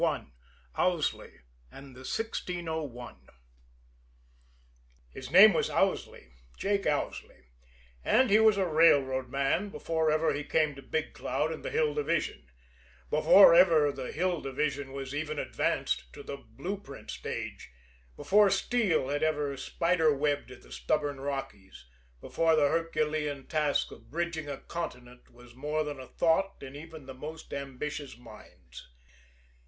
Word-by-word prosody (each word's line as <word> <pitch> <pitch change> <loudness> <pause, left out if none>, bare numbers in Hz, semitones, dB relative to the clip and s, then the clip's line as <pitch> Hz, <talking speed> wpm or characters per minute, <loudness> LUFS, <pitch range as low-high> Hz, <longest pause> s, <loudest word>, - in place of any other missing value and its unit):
II - - 0 0.5
OWSLEY 175 - -1 0.3
AND 135 -1 -12
THE - - -12
1601 160 - -4 1.9
His - - -9
name - - +9
was - - 0
Owsley 65 - -1 0.3
Jake 200 0 0
Owsley 65 - -3 0.5
and 255 - +3
he 215 - +6
was 220 -2 +5
a 195 - +2
railroad 140 -6 +3
man 140 +9 0
before 160 -4 -1
ever 155 +1 +2
he 145 +1 -3
came 155 0 +1
to 135 - -11
Big 155 +3 -3
Cloud 145 +5 -2
and 160 - -7
the - - -3
Hill 155 -2 +1
Division 150 - -2 0.6
before 165 +4 +7
ever 165 -4 +5
the 135 -2 -6
Hill 175 +1 -1
Division 140 0 -2
was 135 0 -6
even 155 +1 -3
advanced - - -1
to - - -10
the 140 - -6
blue 140 - -6
print 140 -9 -10
stage, - - -6 0.5
before 205 0 +4
steel 195 - +1
had 145 +1 -1
ever 150 -3 0
spider 165 +4 +1
webbed 145 0 -1
the - - -18
stubborn 140 - -1
Rockies, 120 - -6 0.3
before 165 - +1
the 145 -2 +3
Herculean 155 -3 -1
task 150 -3 0
of - - -14
bridging 165 -2 -3
a 140 - -4
continent 125 -8 -7
was 120 0 -16
more 150 +4 -2
than 145 -2 -6
a 130 - -9
thought 185 +4 +1
in 135 0 -9
even 160 -1 -10
the 130 - -8
most 155 +5 -9
ambitious 140 0 -5
minds. 65 - -14
150 Hz, 140 wpm, -29 LUFS, 135-165 Hz, 1.9 s, name